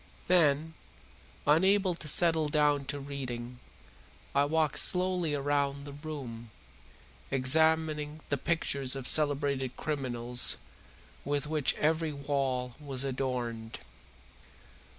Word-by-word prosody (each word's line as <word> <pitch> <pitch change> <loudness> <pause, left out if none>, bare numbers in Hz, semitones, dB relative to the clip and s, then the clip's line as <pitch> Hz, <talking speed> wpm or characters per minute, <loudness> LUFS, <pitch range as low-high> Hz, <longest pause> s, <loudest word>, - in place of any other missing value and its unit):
Then, 160 -3 +4 0.7
unable 190 +5 +3
to 165 -2 -9
settle 160 0 +3
down 145 -2 +1
to 145 +1 -4
reading, 125 -3 -6 0.7
I 140 +1 +3
walked 155 -1 0
slowly 180 -4 +1
round 140 0 -1
the 145 - -9
room, 140 -7 -8 0.8
examining 155 +2 +1
the 145 - 0
pictures 140 -4 -1
of 135 -2 -6
celebrated 140 -3 +3
criminals 125 -5 +2 0.7
with 145 0 -2
which 150 -2 0
every 160 0 0
wall 135 -3 -2
was 140 -3 -2
adorned. 125 -4 -4
145 Hz, 100 wpm, -29 LUFS, 130-155 Hz, 0.8 s, Then